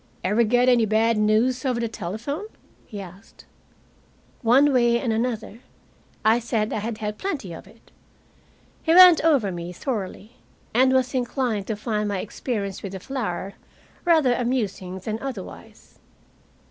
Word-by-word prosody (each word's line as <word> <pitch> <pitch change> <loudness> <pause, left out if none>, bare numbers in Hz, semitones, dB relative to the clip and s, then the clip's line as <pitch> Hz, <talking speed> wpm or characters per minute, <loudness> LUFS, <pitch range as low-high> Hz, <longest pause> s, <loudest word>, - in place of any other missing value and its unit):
"Ever 210 +6 +2
get 245 +2 +3
any 240 -3 +4
bad 225 +2 +2
news 220 +5 +2
over 255 -3 0
the 235 - -1
telephone?" 230 - -5 0.4
he 210 - -8
asked. 190 +2 -13 1.0
One 270 +5 +4
way 240 -2 +3
and 235 -3 -1
another, 225 -1 -3 0.7
I 225 +2 +5
said 225 -2 -1
I - - -1
had 220 +1 -4
had 210 -1 -5
plenty 280 - -4
of 165 - -11
it. 225 - -21 0.9
He 325 0 +2
went 360 -3 +9
over 275 -12 +3
me 175 0 -6
thoroughly, 215 +2 -5 0.4
and 260 +3 +4
was 260 0 +1
inclined 245 -5 -1
to 220 - -2
find 210 -1 -2
my 200 - -1
experience 200 -1 -4
with 195 -1 -7
the 190 - -5
flour 200 -5 -4 0.5
rather 315 -7 +4
amusing 215 -7 -2
than 215 +4 -4
otherwise. 255 -9 -9
230 Hz, 145 wpm, -24 LUFS, 205-255 Hz, 1.0 s, went